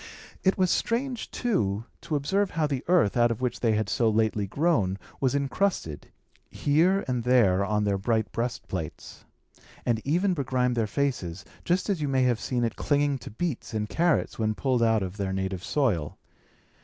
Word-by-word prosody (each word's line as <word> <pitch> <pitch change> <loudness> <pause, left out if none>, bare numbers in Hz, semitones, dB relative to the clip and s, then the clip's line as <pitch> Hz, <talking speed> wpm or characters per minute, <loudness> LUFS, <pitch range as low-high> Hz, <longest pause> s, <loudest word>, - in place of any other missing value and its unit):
It 190 - +3
was 185 -2 +2
strange, 245 +1 -1
too, 110 - -1 0.2
to 155 - -3
observe 190 +8 +1
how 160 -3 0
the 140 -2 -2
earth, 175 - +3
out 120 -1 +4
of 115 - -2
which 125 -2 -2
they 115 -2 +2
had 105 -1 0
so 115 +2 +2
lately 110 -2 +1
grown, 110 - +1 0.2
was 135 0 +1
incrusted, 140 - -1 0.4
here 175 +7 +2
and 125 -2 -1
there, 110 -7 +4
on 105 +1 0
their 100 -1 0
bright 110 +1 0
breastplates, 110 -8 -5 0.6
and 115 -2 +1
even 180 +7 +1
begrimed 130 -4 0
their 115 -2 +1
faces, 100 - -2 0.2
just 180 +1 0
as 195 -6 0
you 145 - 0
may 135 -1 +2
have 120 -3 +2
seen 120 0 -1
it 115 - -1
clinging 145 -2 +1
to - - -9
beets 130 -1 -4
and 105 0 -2
carrots 170 -7 +1
when 110 -1 0
pulled 130 -1 0
out 110 -3 +3
of 95 +2 -6
their 100 -2 -2
native 95 -1 -3
soil. 105 - 0
125 Hz, 180 wpm, -27 LUFS, 105-150 Hz, 0.6 s, out